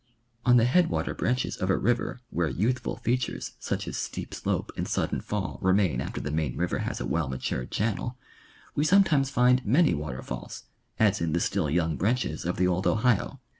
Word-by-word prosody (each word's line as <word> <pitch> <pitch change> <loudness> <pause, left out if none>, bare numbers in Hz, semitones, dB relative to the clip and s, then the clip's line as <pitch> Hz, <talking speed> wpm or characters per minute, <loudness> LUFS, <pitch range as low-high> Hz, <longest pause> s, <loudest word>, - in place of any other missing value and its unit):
On 125 0 +7
the 115 - +5
headwater 170 +7 +2
branches 125 +1 -1
of 95 - -2
a 95 - +3
river 120 +1 0
where 85 -1 0
youthful 120 - -1
features 125 +1 -2
such - - -3
as - - -4
steep - - -5
slope - - -2
and - - -3
sudden - - -1
fall 105 -3 -3
remain 95 -2 +2
after - - -4
the 75 - -4
main 75 -5 -1
river - - 0
has - - -3
a - - -3
well 80 -1 -1
matured 65 -1 -3
channel, 115 +3 -2 0.6
we 145 - +1
sometimes 155 -6 +4
find 125 -1 +3
many 145 +10 +4
water 75 -4 -4
falls, 65 - -7 0.3
as 105 -3 +3
in 80 -2 0
the 85 - +2
still 75 - 0
young 80 -1 +1
branches 115 - 0
of 90 - -1
the 90 - +3
old 90 +1 +1
Ohio. 115 -1 +1
105 Hz, 190 wpm, -27 LUFS, 85-125 Hz, 0.6 s, On